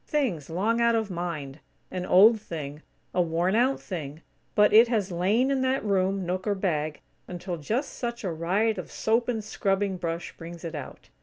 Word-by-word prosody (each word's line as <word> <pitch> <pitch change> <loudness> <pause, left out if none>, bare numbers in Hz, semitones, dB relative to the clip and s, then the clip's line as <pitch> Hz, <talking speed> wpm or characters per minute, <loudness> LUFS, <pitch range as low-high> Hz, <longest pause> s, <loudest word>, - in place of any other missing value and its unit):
Things 230 - -1
long 215 +8 +1
out 235 0 +4
of 220 -3 -1
mind; 160 -5 -4 0.3
an 180 0 -4
old 215 +4 +6
thing; 150 -6 -6 0.3
a 180 - +3
worn 170 +2 +1
out 250 +4 +3
thing; 155 -4 -6 0.3
but 210 0 +5
it 225 +3 +8
has 210 -5 0
lain 205 +10 +2
in 270 -1 +1
that 260 -2 0
room, 195 -1 +1
nook 185 +3 -2
or 205 - +2
bag 155 -6 -1 0.3
until 175 0 -5
just 225 - -2
such 235 -1 -4
a 185 - -1
riot 195 +7 +1
of - - -8
soap 230 +2 +1
and 225 -3 -1
scrubbing 195 -2 0
brush 170 -1 -4
brings 170 0 -9
it 165 - -5
out. 145 -4 -8
190 Hz, 185 wpm, -27 LUFS, 170-225 Hz, 0.3 s, it